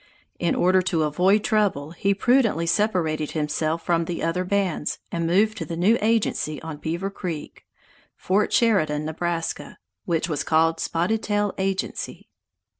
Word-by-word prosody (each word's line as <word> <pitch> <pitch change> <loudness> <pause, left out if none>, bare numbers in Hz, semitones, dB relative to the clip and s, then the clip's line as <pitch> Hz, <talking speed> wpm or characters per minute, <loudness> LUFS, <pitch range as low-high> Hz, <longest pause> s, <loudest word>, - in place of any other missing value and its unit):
In 170 - +1
order 185 +1 +3
to 175 -3 0
avoid 180 +8 +2
trouble, 200 -10 +1
he 195 +4 0
prudently 230 -6 +2
separated 165 -6 0
himself 155 +1 -1
from 170 -1 +1
the 170 0 -4
other 165 +2 0
bands, 185 -5 -1
and 170 -1 -1
moved 210 +6 +2
to - - -3
the 165 - -5
new 195 +7 +4
agency 215 -8 0
on 160 -2 -6
Beaver 170 +6 -3
Creek 170 -6 -6 0.5
(Fort 195 +3 +1
Sheridan, 155 -10 +2
Nebraska), 165 +1 -3 0.3
which 165 -1 0
was 150 -4 -2
called 165 +1 +2
"Spotted 180 +9 0
Tail 205 -1 0
Agency." 190 0 -3
175 Hz, 145 wpm, -24 LUFS, 160-200 Hz, 0.5 s, new